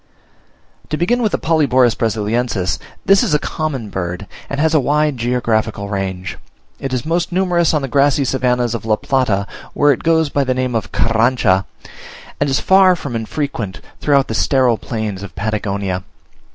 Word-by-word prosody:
To 155 Hz, -, -1 dB
begin 240 Hz, +9 st, +1 dB
with 215 Hz, -3 st, +1 dB
the -, -, +1 dB
Polyborus 130 Hz, -7 st, +3 dB
Brasiliensis: 110 Hz, -2 st, -1 dB, 0.3 s
this 195 Hz, 0 st, +5 dB
is 205 Hz, -11 st, +1 dB
a -, -, +5 dB
common 145 Hz, -8 st, -3 dB
bird, 90 Hz, +1 st, -4 dB, 0.2 s
and 140 Hz, -, -3 dB
has 160 Hz, +1 st, +2 dB
a 155 Hz, -, +5 dB
wide 150 Hz, +2 st, +1 dB
geographical 115 Hz, -4 st, -1 dB
range; 95 Hz, -2 st, -4 dB, 0.4 s
it 135 Hz, -, -4 dB
is 130 Hz, 0 st, -2 dB
most 170 Hz, +2 st, 0 dB
numerous 175 Hz, -2 st, +2 dB
on 150 Hz, -3 st, 0 dB
the -, -, -1 dB
grassy 140 Hz, +1 st, +2 dB
savannahs 125 Hz, -2 st, 0 dB
of 115 Hz, -, -4 dB
La 110 Hz, -1 st, +2 dB
Plata 110 Hz, -6 st, 0 dB, 0.3 s
(where 145 Hz, 0 st, +4 dB
it 135 Hz, -, -1 dB
goes 160 Hz, -2 st, +2 dB
by 140 Hz, 0 st, +1 dB
the 130 Hz, -1 st, 0 dB
name 130 Hz, -1 st, -1 dB
of 115 Hz, -, -2 dB
Carrancha), 115 Hz, -4 st, +2 dB, 0.7 s
and -, -, +1 dB
is 135 Hz, -, +1 dB
far 190 Hz, -1 st, +5 dB
from 140 Hz, -7 st, -6 dB
unfrequent 115 Hz, -3 st, -3 dB, 0.2 s
throughout 140 Hz, -2 st, +2 dB
the -, -, -3 dB
sterile 130 Hz, -5 st, +2 dB
plains 110 Hz, -4 st, -4 dB
of 100 Hz, -2 st, -9 dB
Patagonia. 100 Hz, -3 st, -2 dB
125 Hz, 170 wpm, -18 LUFS, 110-150 Hz, 0.7 s, this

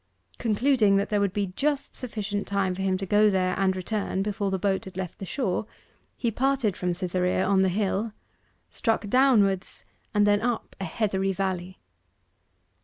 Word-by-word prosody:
Concluding 225 Hz, -2 st, +3 dB
that 200 Hz, 0 st, +1 dB
there 210 Hz, -2 st, +1 dB
would 200 Hz, -2 st, +1 dB
be 200 Hz, -2 st, -2 dB
just 285 Hz, -1 st, -1 dB
sufficient 210 Hz, -4 st, -4 dB
time 195 Hz, -2 st, 0 dB
for 185 Hz, -, -5 dB
him 190 Hz, -1 st, +1 dB
to 195 Hz, -, -4 dB
go 210 Hz, +3 st, +4 dB
there 185 Hz, -2 st, +1 dB
and 190 Hz, -1 st, +2 dB
return 195 Hz, 0 st, -2 dB
before 200 Hz, -1 st, -1 dB
the 190 Hz, -, 0 dB
boat 190 Hz, 0 st, 0 dB
had 190 Hz, -1 st, -10 dB
left 185 Hz, -3 st, -5 dB
the 195 Hz, -, -6 dB
shore, 220 Hz, -4 st, -1 dB, 0.5 s
he 235 Hz, -, 0 dB
parted 260 Hz, -4 st, +1 dB
from 180 Hz, -1 st, -1 dB
Cytherea 180 Hz, +1 st, 0 dB
on 195 Hz, 0 st, +3 dB
the 190 Hz, -, +3 dB
hill, 205 Hz, +3 st, -1 dB, 0.6 s
struck 225 Hz, -2 st, 0 dB
downwards, 210 Hz, -7 st, +3 dB, 0.3 s
and 205 Hz, 0 st, +3 dB
then 205 Hz, 0 st, +3 dB
up 240 Hz, 0 st, -2 dB
a 195 Hz, -, -3 dB
heathery 195 Hz, +1 st, 0 dB
valley. 185 Hz, -1 st, -3 dB
200 Hz, 175 wpm, -26 LUFS, 190-215 Hz, 0.6 s, go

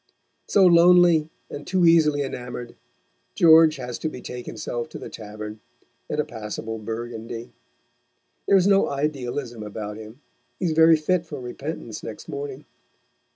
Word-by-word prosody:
So 195 Hz, -2 st, +4 dB
lonely, 170 Hz, -2 st, +6 dB, 0.2 s
and 145 Hz, -, -9 dB
too 185 Hz, -2 st, +2 dB
easily 155 Hz, -4 st, +4 dB
enamoured, 125 Hz, -2 st, -6 dB, 0.6 s
George 160 Hz, -1 st, +7 dB
has 125 Hz, -3 st, -6 dB
to 160 Hz, -, -2 dB
betake 125 Hz, -3 st, -8 dB
himself 120 Hz, -1 st, -5 dB
to -, -, -8 dB
the -, -, -8 dB
tavern, 105 Hz, 0 st, -8 dB, 0.5 s
and -, -, -2 dB
a 150 Hz, -, +1 dB
passable 110 Hz, 0 st, -6 dB
Burgundy. 115 Hz, +1 st, -6 dB, 1.0 s
There 200 Hz, -, +6 dB
is 185 Hz, -, +3 dB
no 195 Hz, 0 st, +4 dB
idealism 135 Hz, -4 st, -3 dB
about 105 Hz, 0 st, -6 dB
him. 110 Hz, +3 st, -11 dB, 0.4 s
He 185 Hz, -, -3 dB
is 165 Hz, -, +1 dB
very 160 Hz, 0 st, +6 dB
fit 170 Hz, +2 st, 0 dB
for 145 Hz, -3 st, -7 dB
repentance 135 Hz, +5 st, -6 dB
next -, -, -8 dB
morning. 425 Hz, -1 st, -6 dB
140 Hz, 145 wpm, -24 LUFS, 115-165 Hz, 1.0 s, George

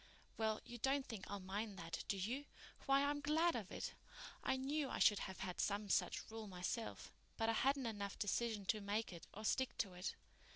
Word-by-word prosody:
"Well, 220 Hz, -1 st, +1 dB
you 240 Hz, 0 st, -7 dB
don't 270 Hz, +3 st, +2 dB
think 220 Hz, -6 st, -5 dB
I'll 205 Hz, -, -2 dB
mind 200 Hz, +2 st, -3 dB
that, 165 Hz, -2 st, -4 dB
do 200 Hz, -, +1 dB
you? 240 Hz, +10 st, -1 dB, 0.4 s
Why, 275 Hz, +1 st, +6 dB
I'm 290 Hz, 0 st, +1 dB
glad 320 Hz, +3 st, +4 dB
of 215 Hz, -6 st, -3 dB
it. -, -, -3 dB, 0.5 s
I 265 Hz, -, +2 dB
knew 280 Hz, +2 st, 0 dB
I -, -, -1 dB
should 210 Hz, -, +6 dB
have 190 Hz, -, -5 dB
had 180 Hz, -2 st, -3 dB
some 205 Hz, 0 st, +1 dB
such -, -, +2 dB
rule 220 Hz, -1 st, -5 dB
myself, 190 Hz, +5 st, -3 dB, 0.3 s
but 225 Hz, -1 st, +2 dB
I -, -, +4 dB
hadn't 270 Hz, +3 st, +3 dB
enough 205 Hz, -3 st, -2 dB
decision 215 Hz, 0 st, 0 dB
to 215 Hz, +2 st, +2 dB
make 205 Hz, 0 st, 0 dB
it 170 Hz, -, -9 dB
or 215 Hz, +2 st, -7 dB
stick 260 Hz, +3 st, +2 dB
to 195 Hz, -4 st, 0 dB
it. 180 Hz, +2 st, -3 dB
220 Hz, 205 wpm, -41 LUFS, 200-260 Hz, 0.5 s, Why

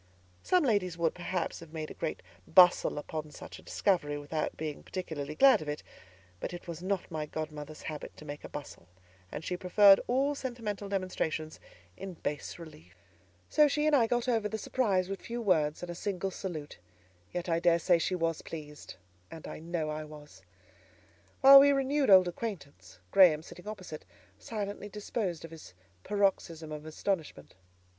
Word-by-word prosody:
Some 365 Hz, -2 st, +3 dB
ladies 200 Hz, -, +1 dB
would, 170 Hz, -1 st, +1 dB
perhaps, 180 Hz, -1 st, -3 dB
have 165 Hz, -1 st, -13 dB
made 155 Hz, -1 st, -5 dB
a -, -, -6 dB
great -, -, -4 dB, 0.2 s
bustle 180 Hz, -2 st, +6 dB
upon 155 Hz, +1 st, -5 dB
such 150 Hz, -, -10 dB
a -, -, -14 dB
discovery 160 Hz, -7 st, 0 dB
without 150 Hz, +2 st, -3 dB
being 155 Hz, -2 st, -5 dB
particularly 155 Hz, -5 st, -5 dB
glad 270 Hz, -, +6 dB
of 150 Hz, -, -5 dB
it; 150 Hz, -, -4 dB, 0.6 s
but -, -, -5 dB
it 175 Hz, -, -11 dB
was 170 Hz, -1 st, -6 dB
not 190 Hz, -1 st, -2 dB
my 155 Hz, -1 st, -3 dB
godmother's 155 Hz, -1 st, -6 dB
habit 150 Hz, -2 st, -7 dB
to 150 Hz, -, -11 dB
make 145 Hz, 0 st, -7 dB
a -, -, -8 dB
bustle, 145 Hz, -11 st, -9 dB, 0.4 s
and 155 Hz, -, -6 dB
she 180 Hz, -, -2 dB
preferred 195 Hz, +2 st, +6 dB
all 270 Hz, +4 st, +2 dB
sentimental 230 Hz, -7 st, -5 dB
demonstrations 170 Hz, -5 st, -2 dB, 0.4 s
in 190 Hz, -2 st, -7 dB
bas 150 Hz, -2 st, -4 dB
relief. 95 Hz, -, -13 dB, 0.5 s
So 300 Hz, -1 st, +5 dB
she 295 Hz, +1 st, 0 dB
and 305 Hz, -1 st, +4 dB
I 235 Hz, -5 st, +4 dB
got 240 Hz, +1 st, 0 dB
over 225 Hz, -4 st, +1 dB
the 220 Hz, -, -3 dB
surprise 200 Hz, -6 st, 0 dB
with 195 Hz, 0 st, -5 dB
few 235 Hz, +1 st, -5 dB
words 160 Hz, -8 st, +1 dB
and 175 Hz, -, -5 dB
a -, -, -4 dB
single 195 Hz, +1 st, -3 dB
salute; 160 Hz, -, -6 dB, 0.5 s
yet 175 Hz, 0 st, -4 dB
I 165 Hz, -1 st, +1 dB
daresay 170 Hz, 0 st, +3 dB
she 185 Hz, -, 0 dB
was 165 Hz, -2 st, -1 dB
pleased, 150 Hz, -2 st, -9 dB, 0.3 s
and 160 Hz, -, -9 dB
I -, -, -7 dB
know 160 Hz, -1 st, -3 dB
I 155 Hz, 0 st, -4 dB
was. 150 Hz, -9 st, -13 dB, 1.0 s
While 275 Hz, +1 st, +11 dB
we 285 Hz, +1 st, +6 dB
renewed 275 Hz, 0 st, +1 dB
old 185 Hz, -2 st, +8 dB
acquaintance, 150 Hz, -, -7 dB
Graham, 165 Hz, -5 st, +6 dB
sitting 180 Hz, +4 st, -12 dB
opposite, 185 Hz, -7 st, -7 dB, 0.4 s
silently 205 Hz, -, -5 dB
disposed 200 Hz, -5 st, -3 dB
of 165 Hz, -, -11 dB
his 160 Hz, -, -12 dB, 0.3 s
paroxysm 185 Hz, -6 st, 0 dB
of 150 Hz, 0 st, -7 dB
astonishment. 155 Hz, -, -3 dB
175 Hz, 170 wpm, -31 LUFS, 155-205 Hz, 1.0 s, While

